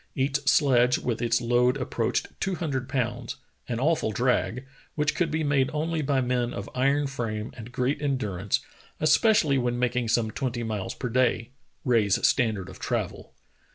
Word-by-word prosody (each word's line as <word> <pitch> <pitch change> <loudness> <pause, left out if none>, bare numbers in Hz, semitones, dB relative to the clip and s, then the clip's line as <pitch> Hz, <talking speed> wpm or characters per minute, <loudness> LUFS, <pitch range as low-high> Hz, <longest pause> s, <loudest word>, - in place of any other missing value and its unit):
Each 135 +1 +1
sledge 125 -3 +4
with 120 -1 -3
its 120 0 +1
load 125 +2 +2
ap 130 - -5
proached 115 - 0
two 195 -1 -1
hundred 140 -6 -3
pounds, 120 -2 -2 0.3
an 120 -1 -1
awful 150 -4 +1
drag, 125 +2 0 0.3
which 150 -1 +1
could 175 -2 0
be 155 +1 -1
made 140 -3 +2
only 160 +1 -1
by 140 -2 +1
men 125 -1 -1
of 100 +2 -5
iron 140 +3 +2
frame 115 -5 -4
and 115 +1 -9
great 130 +4 -1
endurance, 105 -9 -1 0.4
especially 155 - +4
when 120 -1 -1
making 125 -1 0
some 110 -1 +1
twenty 125 -2 -3
miles 105 -4 -3
per 125 - -4
day 120 -1 +1 0.2
— - - -42
Rae's 110 -6 +3
standard 110 -6 +1
of 95 - -11
travel. - - -3
125 Hz, 170 wpm, -26 LUFS, 115-140 Hz, 0.4 s, sledge